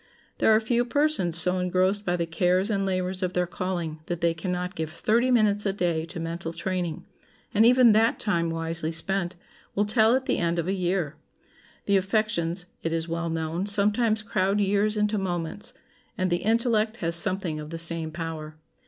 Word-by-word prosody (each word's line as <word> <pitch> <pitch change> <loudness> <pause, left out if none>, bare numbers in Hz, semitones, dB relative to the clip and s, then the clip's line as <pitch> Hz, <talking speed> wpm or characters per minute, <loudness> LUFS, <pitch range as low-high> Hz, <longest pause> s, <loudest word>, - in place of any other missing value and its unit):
There - - +3
are - - +4
few 235 +2 +1
persons 245 - +1
so 180 +1 +4
engrossed 185 +3 +1
by 175 - +2
the 170 -1 -1
cares 180 +4 +1
and 195 -1 0
labors 185 0 -2
of 185 -1 -1
their 180 0 +1
calling 175 -3 -4
that 175 -1 -3
they 170 0 +2
can 165 +3 -4
not 180 +1 -3
give 160 -3 -4
thirty 230 +8 +1
minutes 210 -4 +3
a 195 - 0
day 170 -4 -1
to 170 +1 -8
mental 165 0 -5
training; 175 -2 -3 0.5
and 220 +2 +5
even 250 -1 +6
that 225 +2 +3
time, 170 -5 0
wisely 165 0 -3
spent, 175 +2 -2 0.4
will 205 - +2
tell 220 +2 +4
at 260 0 -1
the 260 - 0
end 170 0 0
of 170 0 -1
a 190 - 0
year. 175 -5 -1 0.7
The 200 -1 +3
affections, 190 -3 -1 0.2
it 165 - -2
is 165 0 -2
well 170 0 -3
known, 165 +3 -2
sometimes 210 +2 +3
crowd 195 0 0
years 205 +2 +1
into 210 0 +1
moments; 175 0 -4 0.5
and 185 -1 0
the 175 - +3
intellect 225 +1 +1
has 170 -4 -1
something 170 -2 0
of 150 0 -8
the 165 - -5
same 165 -1 0
power. 160 -1 -6
185 Hz, 190 wpm, -26 LUFS, 165-210 Hz, 0.7 s, even